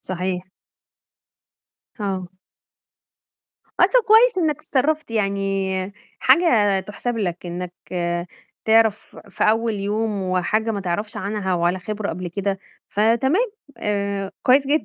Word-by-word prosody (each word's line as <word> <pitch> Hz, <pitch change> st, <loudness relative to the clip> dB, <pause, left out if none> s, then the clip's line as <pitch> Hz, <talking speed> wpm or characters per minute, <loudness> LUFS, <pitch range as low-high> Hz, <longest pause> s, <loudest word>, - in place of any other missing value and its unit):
صحيح. 185 Hz, 0 st, -4 dB, 1.5 s
آه. 190 Hz, -3 st, -3 dB, 1.5 s
آه، -, -, +4 dB
طَب -, -, +3 dB
كويس 445 Hz, 0 st, +6 dB
إنّك 315 Hz, -4 st, +1 dB
اتصرّفت، 310 Hz, -1 st, 0 dB
يعني 195 Hz, -2 st, -1 dB, 0.3 s
حاجة 235 Hz, -, +4 dB
تُحسَب 210 Hz, +5 st, -4 dB
لك، 180 Hz, -4 st, -3 dB
إنّك 175 Hz, +1 st, -5 dB, 0.9 s
تعرف 220 Hz, -1 st, +3 dB
في 195 Hz, -, -1 dB
أول 225 Hz, +1 st, +2 dB
يوم 205 Hz, 0 st, -1 dB
وحاجة 185 Hz, +5 st, 0 dB
ما 205 Hz, -2 st, -2 dB
تعرفش 195 Hz, +3 st, -3 dB
عنها 200 Hz, -2 st, -2 dB
ولا 175 Hz, +1 st, +1 dB
خبرة 210 Hz, +2 st, -4 dB
قبل 175 Hz, +2 st, -4 dB
كده، 195 Hz, +2 st, -2 dB, 0.3 s
فتمام 265 Hz, -, +2 dB, 0.3 s
آآ، 200 Hz, -2 st, -2 dB
كويس 270 Hz, +2 st, +4 dB
جدًا. 300 Hz, +3 st, +2 dB
205 Hz, 115 wpm, -22 LUFS, 190-230 Hz, 1.5 s, كويس